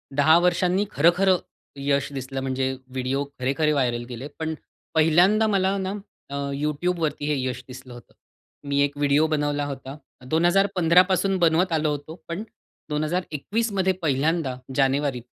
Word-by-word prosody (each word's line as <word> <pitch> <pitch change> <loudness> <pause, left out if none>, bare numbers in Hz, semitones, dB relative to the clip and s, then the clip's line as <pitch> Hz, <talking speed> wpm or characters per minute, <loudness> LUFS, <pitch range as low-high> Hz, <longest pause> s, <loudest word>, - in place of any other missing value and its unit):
10 155 +3 +6
वर्षांनी 180 +2 +2
खरं-खरं 180 +4 +4 0.4
यश 140 0 0
दिसलं, 135 0 -5
म्हणजे 130 0 -1 0.2
व्हिडिओ 130 +2 -1 0.2
खरे-खरे 140 +4 +1
व्हायरल 120 -4 0
गेले. 125 +3 -6
पण 160 0 -2 0.4
पहिल्यांदा 175 +8 +4
मला 195 -1 +1
ना 190 0 -3 0.4
अ, - - -2 0.2
YouTubeवरती 150 +1 -1
हे 150 - +1
यश 125 -1 -4
दिसलं 125 -1 -11
होतं. 120 -3 -14 0.5
मी 140 0 0
एक 145 0 +1
व्हिडिओ 145 +1 +3
बनवला 145 -1 0
होता 135 -1 -7 0.3
2015 175 +1 +4
पासून 190 +1 +1
बनवत 170 +1 +2
आलो 155 -1 +1
होतो. 145 +2 -6
पण 170 +6 -4 0.5
2021मध्ये 185 +6 -1
पहिल्यांदा 150 -1 0 0.2
जानेवारीत 135 -2 +1
150 Hz, 135 wpm, -24 LUFS, 140-180 Hz, 0.5 s, 10